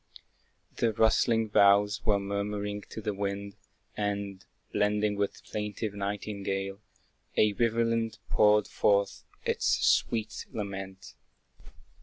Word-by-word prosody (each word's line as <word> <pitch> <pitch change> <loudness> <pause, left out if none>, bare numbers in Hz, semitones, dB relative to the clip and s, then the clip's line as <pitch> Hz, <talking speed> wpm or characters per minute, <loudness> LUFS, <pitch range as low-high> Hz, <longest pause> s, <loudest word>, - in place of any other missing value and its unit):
The 115 -2 +1
rustling 110 0 +3
boughs 105 +2 +4
were 105 -3 +3
murmuring 100 +1 -3
to 110 - -7
the 105 0 -2
wind, 100 0 -4 0.4
And, 100 -2 -3 0.3
blending 105 0 +1
with 100 0 -1
the - - -17
plaintive 105 0 -3
nightingale, 100 -1 -3 0.6
A 105 -1 +4
rivulet 115 0 +1
poured 105 0 +4
forth 100 -1 +1 0.2
its - - 0
sweet 110 -2 +1
lament. 95 -2 -6
105 Hz, 105 wpm, -29 LUFS, 100-105 Hz, 0.6 s, boughs